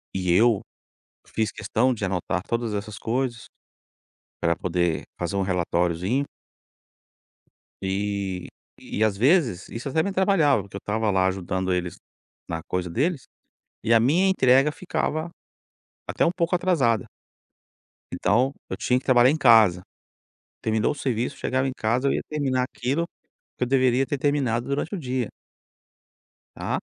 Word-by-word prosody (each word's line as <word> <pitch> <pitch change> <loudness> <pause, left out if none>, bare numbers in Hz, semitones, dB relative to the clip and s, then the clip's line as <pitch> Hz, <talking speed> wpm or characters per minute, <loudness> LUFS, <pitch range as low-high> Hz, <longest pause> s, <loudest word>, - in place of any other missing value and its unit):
e 90 -2 0
eu 110 +2 +4 0.7
fiz 110 -1 -2
questão 120 +4 0
de 105 - -4
anotar 90 -1 -1
todas 115 -2 -1
essas 105 +1 -5
coisas, 120 0 -2 1.0
pra 85 0 +2
poder 85 -2 0 0.2
fazer 90 +3 -3
um 100 - +1
relatoriozinho. 90 +6 0 1.6
E 95 -1 -2 0.3
e, 110 - -2
às 105 -3 +2
vezes, 125 - +2
isso 115 +4 -6
até 160 +4 +1
me 200 - -1
atrapalhava, 185 - +3
porque 100 0 -14
eu - - -4
estava 110 +1 -1
lá 95 0 +3
ajudando 95 0 -2
eles 90 -1 -1 0.5
na 80 -1 -3
coisa 90 -1 -3
deles 140 - 0 0.6
e 115 - +3
a 115 - +6
minha 165 +11 +3
entrega 135 -5 +4
ficava 160 -1 -2 0.8
até - - +1
um 170 - +3
pouco 175 0 0
atrasada. 145 - +2 1.1
Então, 130 +3 +1 0.2
eu - - -2
tinha 125 0 +1
que - - -22
trabalhar 125 -1 +6
em 155 - +1
casa. 110 - +5 0.8
Terminou 110 0 +1
o - - -6
serviço, 125 -4 -2
chegava 130 +1 0
em - - -3
casa, 120 +5 +1
eu - - +2
ia - - -1
terminar 135 -4 0
aquilo 135 +6 -2 0.5
que 125 - 0
eu - - -5
deveria 130 0 +3
ter 140 +2 -2
terminado 130 -4 0
durante 145 +7 -2
o - - -3
dia. 130 -5 -2 1.2
Tá. - - -2
120 Hz, 145 wpm, -24 LUFS, 95-135 Hz, 1.6 s, a